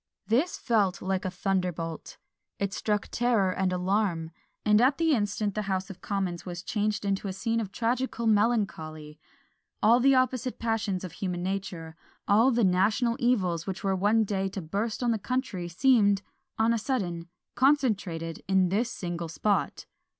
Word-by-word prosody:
This 265 +11 +1
fell 215 -7 +2
like 190 0 -2
a - - 0
thunderbolt; 180 -4 -3 0.4
it 200 -1 -2
struck 210 -1 -1
terror 230 -6 +2
and 185 0 0
alarm; 180 -3 0 0.3
and 210 +1 +5
at 265 +3 +4
the 330 -1 +2
instant 205 -3 0
the 215 - -2
House 190 0 -2
of 185 - -13
Commons 190 -4 -2
was 175 -1 -6
changed 210 0 -1
into 200 0 -1
a 190 - -3
scene 225 +4 -1
of 205 -4 -4
tragical 235 +1 -1
melancholy! 200 -9 0 0.6
All 230 +3 +6
the 270 +2 +5
opposite 255 -1 0
passions 225 -5 -1
of 185 - -6
human 180 0 -4
nature 180 -4 -4 0.3
all 220 +6 +5
the 240 -2 +2
national 205 +6 +2
evils 185 - +1
which 190 -1 -4
were 195 -1 +1
one 210 +4 +3
day 195 -2 -1
to 195 - -5
burst 210 +9 -2
on 240 - +2
the 225 - 0
country 220 -6 -2
seemed, 205 +1 +3 0.3
on 225 +1 +3
a 230 - 0
sudden, 180 -9 -2 0.3
concentrated 205 - +1
in 190 -1 +3
this 220 +6 0
single 175 -7 -4
spot! 205 +5 -1
200 Hz, 165 wpm, -28 LUFS, 185-230 Hz, 0.6 s, All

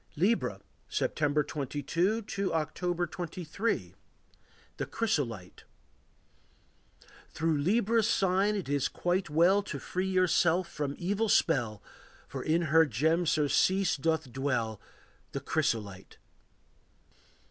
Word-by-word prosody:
Libra. 200 +9 +1 0.3
September 150 0 +1
22 160 - -1
to 200 -2 -2
October 175 +3 -1
23. 175 +5 -3 0.8
The - - -3
Chrysolite. 130 - -2 1.7
Through 160 -2 0
Libra's 220 +6 +2
sign 195 +2 +2
it 195 - -3
is 140 -1 +1
quite 175 0 -1
well 175 +6 +4
To 200 - -6
free 185 +1 -3
yourself 180 -1 +3
from 145 -2 -4
evil 205 +5 -1
spell, 120 - +2 0.4
For - - -6
in 165 +2 +1
her 160 -1 +6
gem 160 +8 +1
surcease 165 +5 +2
doth 160 -1 -1
dwell, 120 -5 -1 0.5
The 140 - -2
chrysolite. 110 -10 -2
165 Hz, 105 wpm, -30 LUFS, 145-190 Hz, 1.7 s, her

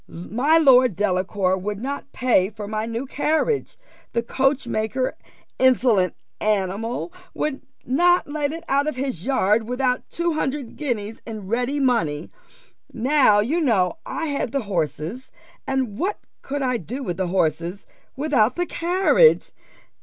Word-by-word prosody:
My 245 - +1
Lord 255 - +5
Delacour 185 -1 +1
would 200 +2 -4
not 280 +3 -5
pay 235 -7 +2
for 210 -1 -8
my 215 +1 -2
new 230 +3 -3
carriage. 315 - 0 0.4
The 235 - 0
coachmaker, 255 -2 0 0.5
insolent 245 -7 +3 0.2
animal, 215 - -1 0.2
would 300 -3 -2 0.2
not 350 +8 +3
let 290 -1 -2
it 330 +1 -7
out 280 +2 +2
of 305 - -1
his 255 - -4
yard 220 -4 +2
without 250 0 -1
two 340 0 -1
hundred 275 -4 -3
guineas 225 -7 -3
in 215 -3 -6
ready 245 +7 -1
money. 200 - 0 0.6
Now 250 -4 +4
you 305 +11 0
know 225 - +1
I 325 - -4
had 285 -6 -2
the 275 - 0
horses, 175 - -3 0.4
and 260 -6 -1
what 390 +4 -1 0.2
could 285 0 -3
I 250 -2 +1
do 240 - -6
with 175 -7 -3
the 185 - -1
horses 170 +1 -1 0.3
without 270 -6 +2
the 355 - 0
carriage? 370 +8 +3
250 Hz, 140 wpm, -23 LUFS, 205-280 Hz, 0.6 s, Lord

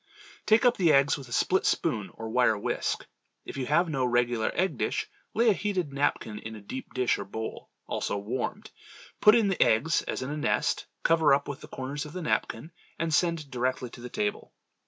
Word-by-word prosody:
Take 220 +3 +5
up 245 - +4
the 170 -4 +4
eggs 140 +1 +4
with 135 -4 -9
a - - -14
split 185 +9 +2
spoon 110 -11 0
or 110 0 -6
wire 120 -3 +3
whisk. 100 - -2 0.4
If - - -7
you 130 -2 -3
have 170 +4 +3
no 135 -5 -1
regular 120 -2 +1
egg 185 +2 0
dish, - - -1 0.3
lay 230 +1 +4
a - - +4
heated 185 -8 -2
napkin 125 -6 -1
in 110 +1 -7
a - - -9
deep 130 +8 -8
dish 125 -1 +1
or - - -3
bowl 110 +3 -6 0.2
(also - - -2
warmed), 110 +5 -4 0.5
put 210 +2 +7
in 225 -3 +4
the 195 - 0
eggs 130 +10 +3
as - - -2
in 135 - -4
a 150 - -3
nest, 150 - 0 0.2
cover 160 -4 +5
up 140 - -3
with 145 - -6
the - - -10
corners 135 +3 -5
of 150 - -11
the 185 - -5
napkin, 160 +1 -1 0.3
and 165 -1 -1
send 165 -4 +1
directly 125 -1 -1
to 120 - -11
the 125 - -7
table. 210 - -3
140 Hz, 210 wpm, -28 LUFS, 120-170 Hz, 0.5 s, put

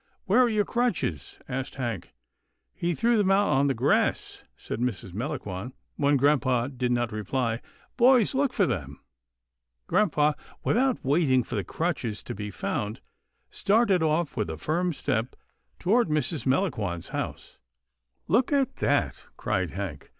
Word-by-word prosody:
" - - -45
Where 205 +6 +4
are 245 - +4
your 210 -2 +1
crutches? 175 - -1
" - - -39
asked 130 +1 -4
Hank. 115 -9 -4 0.3
" - - -51
He 175 -2 -1
threw 235 +4 +2
them 205 -3 +2
out 200 +1 +4
on 140 +2 +3
the 135 - +1
grass," 130 +5 +1
said - - -5
Mrs. 110 -7 -3
Melangon, 115 -2 -4 0.2
when 145 0 +3
grampa 130 -3 +2
did 125 -1 0
not 120 -1 0
reply, 115 +2 -2 0.2
" - - -33
boys, 250 -1 +5
look 270 0 +1
for 200 -6 +2
them." 70 - -4 0.9
Grampa, 155 -6 +2 0.3
without 255 - +1
waiting 135 -3 +3
for - - -9
the 100 -4 -1
crutches 125 - -3
to - - -5
be 105 +1 -5
found, 105 +2 -3 0.5
started 200 -3 +3
off 155 0 +1
with 105 -7 -1
a 80 - -4
firm 175 - 0
step 120 -5 -2 0.4
toward 225 +5 +2
Mrs. 150 -1 -1
Melangon's 110 - 0
house. - - -5 0.3
" - - -50
Look 250 +4 +2
at 275 -2 +1
that," - - 0
cried - - -1
Hank. - - -6
140 Hz, 160 wpm, -27 LUFS, -, 0.9 s, boys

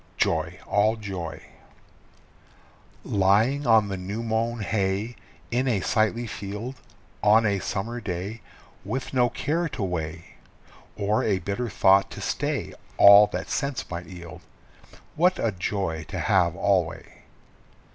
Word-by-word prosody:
JOY, - - 0
ALL 105 +2 +2
JOY. 95 -7 -6 1.6
Lying 110 +8 +2
on 110 -3 +5
the 95 -1 -4
new 100 +5 -5
mown 115 +1 -1
hay, 100 +3 -1 0.4
in 125 +3 +1
a 110 -6 +1
sightly 110 +4 +1
field, 105 +3 -6 0.5
On 110 +2 +5
a 100 -2 +1
summer 115 +6 -4
day, 100 +3 -5 0.4
With 130 +1 -4
no 125 -2 +3
care 165 +7 -1
to 125 - -4
weigh, 80 -2 -5 0.6
Or 105 +1 +1
a 100 -3 +1
bitter 100 +6 -3
thought 95 -1 +4
to - - -6
stay - - -2 0.2
all 100 +1 +9
that 95 -1 -5
sense 140 -2 -2
might 85 +1 -5
yield 85 -3 -10 0.7
What 180 +4 +3
a 115 - 0
joy 90 -3 -3
to - - -5
have 90 -3 +2
alway! 95 -3 -1
105 Hz, 130 wpm, -25 LUFS, 95-115 Hz, 1.6 s, all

